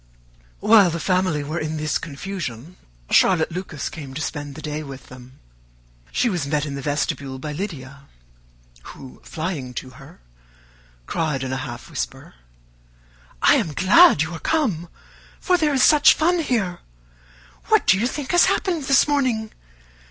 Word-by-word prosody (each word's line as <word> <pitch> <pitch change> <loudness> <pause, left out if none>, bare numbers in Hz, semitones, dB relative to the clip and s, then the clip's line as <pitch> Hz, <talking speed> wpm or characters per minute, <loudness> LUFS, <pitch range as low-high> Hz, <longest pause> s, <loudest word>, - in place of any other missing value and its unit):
While 210 -4 +6
the 170 0 -3
family 180 -4 0
were 155 +4 -4
in 155 0 -3
this 155 0 -1
confusion, 165 - -7 0.4
Charlotte 170 -3 +4
Lucas 170 -5 -5
came 140 -4 -8
to 155 - -4
spend 145 -2 -5
the 155 - -9
day 150 0 -4
with 135 -3 -10
them. 130 +1 -14 0.7
She 250 - +1
was 175 -10 -2
met 150 0 0
in 145 - -5
the 140 - -5
vestibule 140 -1 -2
by 150 +3 -6
Lydia, 140 -6 -7 0.9
who, 130 -2 -13
flying 155 -7 -5
to 130 - -6
her, - - -15 0.9
cried 150 - -2
in 130 0 -3
a - - -2
half 120 -3 -7
whisper, - - -6 1.1
"I - - +6
am 155 - -2
glad 210 - +6
you 160 +2 -6
are 165 - -6
come, 210 - -1 0.5
for 365 - +2
there 310 -4 +1
is 260 - +3
such 300 -1 +6
fun 345 +3 +2
here! 220 - -1 0.9
What - - +3
do 190 - +4
you 235 - +1
think 275 +1 -5
has 350 -1 +6
happened 370 -6 0
this 275 +1 +4
morning? 255 -7 0
160 Hz, 160 wpm, -22 LUFS, 140-220 Hz, 1.1 s, While